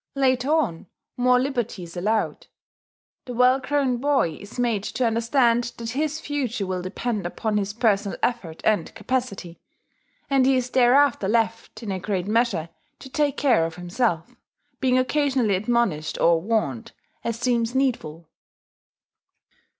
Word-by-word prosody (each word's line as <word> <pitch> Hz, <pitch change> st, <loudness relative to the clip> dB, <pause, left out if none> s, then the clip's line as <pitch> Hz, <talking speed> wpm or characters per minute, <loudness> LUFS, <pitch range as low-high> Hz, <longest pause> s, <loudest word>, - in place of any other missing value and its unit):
Later 260 Hz, -1 st, +1 dB
on, 230 Hz, -, 0 dB, 0.3 s
more 250 Hz, 0 st, +3 dB
liberty 240 Hz, -7 st, -2 dB
is 170 Hz, 0 st, -11 dB
allowed. 215 Hz, +5 st, -1 dB, 0.8 s
The 245 Hz, -, -6 dB
well 250 Hz, +2 st, +4 dB
grown 265 Hz, -1 st, 0 dB
boy 265 Hz, -, +1 dB
is 205 Hz, +4 st, -11 dB
made 235 Hz, -4 st, +1 dB
to 255 Hz, -, -1 dB
understand 235 Hz, +1 st, +2 dB
that 230 Hz, -1 st, -5 dB
his 305 Hz, +4 st, -1 dB
future 260 Hz, -9 st, -2 dB
will 185 Hz, -1 st, -3 dB
depend 205 Hz, +1 st, -3 dB
upon 210 Hz, +4 st, -2 dB
his 200 Hz, -1 st, -1 dB
personal 210 Hz, -3 st, +1 dB
effort 190 Hz, -10 st, -2 dB
and 215 Hz, -1 st, +1 dB
capacity; 235 Hz, -9 st, -3 dB, 0.7 s
and 270 Hz, -2 st, +3 dB
he 270 Hz, -, +4 dB
is 250 Hz, -1 st, -1 dB
thereafter 255 Hz, -3 st, +4 dB
left, 225 Hz, +1 st, -1 dB
in 210 Hz, -, -4 dB
a 190 Hz, -, -2 dB
great 185 Hz, -1 st, -2 dB
measure, 210 Hz, -6 st, 0 dB, 0.3 s
to 265 Hz, -, -12 dB
take 290 Hz, -1 st, 0 dB
care 250 Hz, -, +3 dB
of 165 Hz, 0 st, -3 dB
himself, 180 Hz, +4 st, -2 dB, 0.4 s
being 255 Hz, -1 st, +2 dB
occasionally 260 Hz, -4 st, +1 dB
admonished 195 Hz, -6 st, 0 dB
or 165 Hz, -1 st, +4 dB
warned, 185 Hz, -, -2 dB, 0.3 s
as 230 Hz, -1 st, -2 dB
seems 240 Hz, 0 st, 0 dB
needful. 230 Hz, -, -1 dB
235 Hz, 140 wpm, -24 LUFS, 195-255 Hz, 0.8 s, well